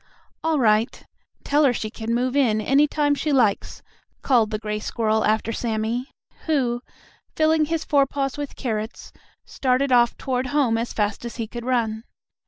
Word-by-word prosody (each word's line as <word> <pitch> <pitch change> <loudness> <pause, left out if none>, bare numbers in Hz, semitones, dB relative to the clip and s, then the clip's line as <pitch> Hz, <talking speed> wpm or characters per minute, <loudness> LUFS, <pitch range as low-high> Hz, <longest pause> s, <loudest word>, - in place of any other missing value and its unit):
"All 320 -1 +1
right. 220 -2 +1 0.4
Tell 295 +2 +2
her 265 -4 +4
she 215 -2 -4
can 225 0 -3
move 250 +2 0
in 235 -7 +3
any 275 +7 +3
time 290 -1 +1
she 300 +1 -1
likes," 235 -8 +1 0.4
called 235 -5 +3
the 215 - -2
gray 210 0 -4
squirrel 220 0 0
after 220 +1 +1
Sammie, 230 +2 -2 0.4
who, 250 -6 +1 0.5
filling 315 0 +3
his 325 +1 -2
forepaws 275 -2 +1
with 290 -1 -6
carrots, 220 -3 -4 0.3
started 260 +1 0
off 240 -1 +4
toward 255 -1 -2
home 265 -4 +2
as 235 - -3
fast 210 0 -2
as 235 - -6
he 230 - -3
could 235 +2 -7
run. 225 -3 0
245 Hz, 165 wpm, -23 LUFS, 220-280 Hz, 0.5 s, her